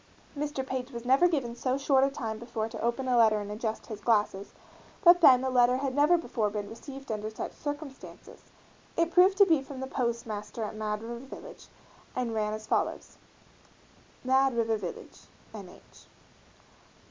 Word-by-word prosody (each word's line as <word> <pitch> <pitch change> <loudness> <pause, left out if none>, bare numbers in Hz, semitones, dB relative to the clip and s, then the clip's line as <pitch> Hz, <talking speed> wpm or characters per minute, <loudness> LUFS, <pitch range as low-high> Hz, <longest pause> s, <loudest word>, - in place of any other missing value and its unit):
Mr. 290 -2 -3
Page 260 -1 -4
was 235 -2 -8
never 270 +8 +5
given 270 -9 -2
so 255 +2 -1
short 275 -1 +3
a 275 - +3
time 225 -5 -5
before 235 -2 -4
to - - -8
open 240 +3 -1
a 250 - +2
letter 220 -2 +5
and 205 0 -6
adjust 220 +1 -4
his 215 -2 -8
glasses, 205 -3 +1 0.5
but 350 0 +7
then 260 -5 +7
a 265 - 0
letter 250 0 +4
had 270 -1 -2
never 295 +5 +4
before 225 -10 -1
been 205 0 -4
received 270 +3 -9
under 215 0 -3
such 220 - -6
circumstances. 290 -2 -8 0.6
It 335 0 +2
proved 370 +2 +5
to 400 - +8
be 325 -6 +3
from 270 -1 -9
the 265 - -3
postmaster 235 -4 -3
at 210 - -4
Mad 215 0 -3
River 235 +2 -7
Village, 385 - -11 0.5
and 245 -2 -2
ran 215 -1 -1
as 215 0 -6
follows: - - -2 1.0
Mad 265 -1 +2
River 225 -1 +1
Village, 190 -5 -8 0.3
N. - - -9
H. - - -18
245 Hz, 175 wpm, -29 LUFS, 220-275 Hz, 1.0 s, to